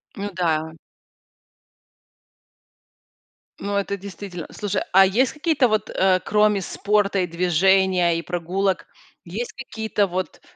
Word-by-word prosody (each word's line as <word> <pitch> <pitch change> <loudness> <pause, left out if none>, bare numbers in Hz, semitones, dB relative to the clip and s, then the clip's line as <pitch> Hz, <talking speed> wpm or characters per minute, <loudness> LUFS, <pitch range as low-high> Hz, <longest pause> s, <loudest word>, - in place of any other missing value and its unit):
Ну 200 +1 -4
да. 160 -3 0 2.9
Ну, 200 0 -3
это 200 0 -1
действительно 190 -3 -8
Слушай, 205 -2 -2
а 190 +1 +8
есть 230 +6 +2
какие-то 300 -4 +2
вот, 215 -1 0
э, 185 -1 +2
кроме 210 -1 +2
спорта 200 +1 0
и 180 - 0
движения, 180 +1 +2
и - - -2
прогулок, 180 +3 -1 0.4
есть 215 +8 -5
какие-то 220 -5 -2
вот, 185 -3 -4
195 Hz, 115 wpm, -22 LUFS, 180-210 Hz, 2.9 s, а